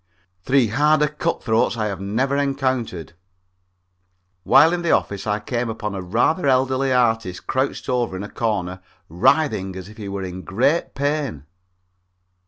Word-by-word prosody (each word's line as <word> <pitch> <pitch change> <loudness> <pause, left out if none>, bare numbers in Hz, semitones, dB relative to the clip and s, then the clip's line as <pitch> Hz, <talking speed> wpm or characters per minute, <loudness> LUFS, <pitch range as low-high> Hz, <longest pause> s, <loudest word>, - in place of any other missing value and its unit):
Three 125 +3 +2
harder 150 +5 +3
cut 150 0 -3
throats 115 0 +1
I 110 - -1
have 100 -3 -4
never 120 +8 0
encountered. 130 - -1 1.3
While 160 - +5
in 175 - -1
the 170 - -1
office, 100 -6 0
I 105 0 0
came 120 +2 -3
upon 105 -2 -4
a 95 - -4
rather 120 - +1
elderly 130 0 +2
artist 115 -7 +1
crouched 130 +1 -2
over 120 -6 -1
in 95 - -5
a 105 - -7
corner 95 -5 -2 0.3
writhing 95 - +1
as 95 +1 -8
if 110 - -14
he 105 -3 -6
was 100 -1 -4
in 90 +1 -7
great 130 - 0
pain. 140 - -2
115 Hz, 155 wpm, -21 LUFS, 100-135 Hz, 1.3 s, While